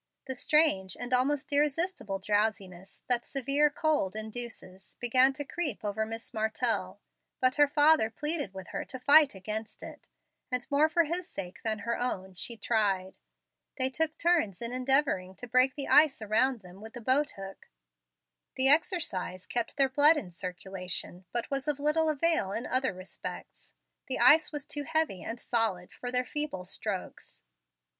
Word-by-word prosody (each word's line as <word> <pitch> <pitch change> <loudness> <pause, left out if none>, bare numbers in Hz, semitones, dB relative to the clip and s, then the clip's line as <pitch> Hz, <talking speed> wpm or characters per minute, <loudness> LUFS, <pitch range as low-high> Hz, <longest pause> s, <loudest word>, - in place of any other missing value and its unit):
The 265 - -3
strange 265 - +2
and 245 +1 -4
almost 275 +3 +1
irresistible 295 - 0
drowsiness 200 -2 -2
that 245 -1 +1
severe 275 +3 +1
cold 290 -10 0
induces 220 -4 -8
began 255 +2 +4
to 290 - -5
creep 285 -10 -4
over 220 +1 -1
Miss 225 +1 -7
Martell, 220 0 -1 0.4
but 255 +1 +2
her 290 0 +6
father 290 -4 +4
pleaded 295 - -2
with 190 -1 -9
her - - -4
to 260 - -6
fight 285 0 +5
against 215 +3 -6
it; - - -11 0.4
and, 250 -1 -1
more 295 +2 +4
for 335 +1 +3
his 345 +3 -3
sake 180 -2 -7
than 220 -1 -1
her 230 +3 -3
own, 190 -6 -3
she 230 +6 -6
tried. 195 -5 0 0.6
They 260 -1 0
took 315 +3 -1
turns 330 - +1
in 235 0 -4
endeavoring 255 -8 +1
to 245 - -9
break 255 +2 +3
the 280 -2 -3
ice 300 -2 +5
around 225 +3 +1
them 185 +1 -14
with 220 +1 -10
the 240 - -8
boat 265 +5 +1
hook. 195 0 -10 0.9
The 260 +1 +4
exercise 285 - +1
kept 240 +2 -3
their 275 -1 +5
blood 290 +4 +5
in 195 -11 -5
circulation, 180 0 -5
but 240 +2 -3
was 275 +1 -2
of 295 -1 0
little 305 +2 +2
avail 310 - +1
in 235 - -3
other 260 0 0
respects. 185 +1 -9 0.3
The 265 - -1
ice 295 +6 +6
was 295 -2 -5
too 290 - -5
heavy 315 - -1
and 230 +1 -6
solid 220 -8 -1
for 245 - -6
their 250 0 0
feeble 295 -13 -3
strokes. 195 +1 -6
250 Hz, 165 wpm, -29 LUFS, 200-290 Hz, 0.9 s, her